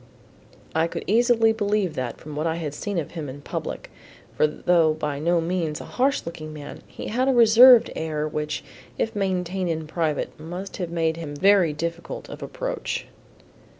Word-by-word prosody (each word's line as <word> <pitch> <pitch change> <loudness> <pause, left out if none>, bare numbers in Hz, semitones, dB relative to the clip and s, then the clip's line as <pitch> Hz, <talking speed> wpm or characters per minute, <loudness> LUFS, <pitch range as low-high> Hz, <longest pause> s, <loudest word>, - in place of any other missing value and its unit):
I 160 +1 +2
could - - -5
easily 225 +1 +4
believe 205 -5 0
that 130 -5 -4
from 150 -1 -9
what 155 +2 -1
I 160 - 0
had 155 -4 -4
seen 200 +5 -4
of 160 - -3
him 155 -5 -5
in 140 +2 -9
public, - - -5 0.4
for 155 - +4
though 160 0 +2
by 150 -2 -3
no 170 +3 +2
means 165 -2 -1
a - - -8
harsh 270 +3 0
looking 155 -2 -7
man, 150 -2 -9
he - - -7
had 255 +4 +1
a 270 - +4
reserved 240 +1 +8
air 155 -1 -2
which 150 0 -3 0.3
if 225 - -1
maintained 185 -2 -1
in 160 -1 -2
private 155 -2 -2
must 175 +5 -7
have 180 -3 -3
made 165 -1 0
him 150 -3 -6
very 190 0 +4
difficult 170 +3 -5
of - - -9
approach. - - -4
170 Hz, 180 wpm, -24 LUFS, 155-205 Hz, 0.4 s, reserved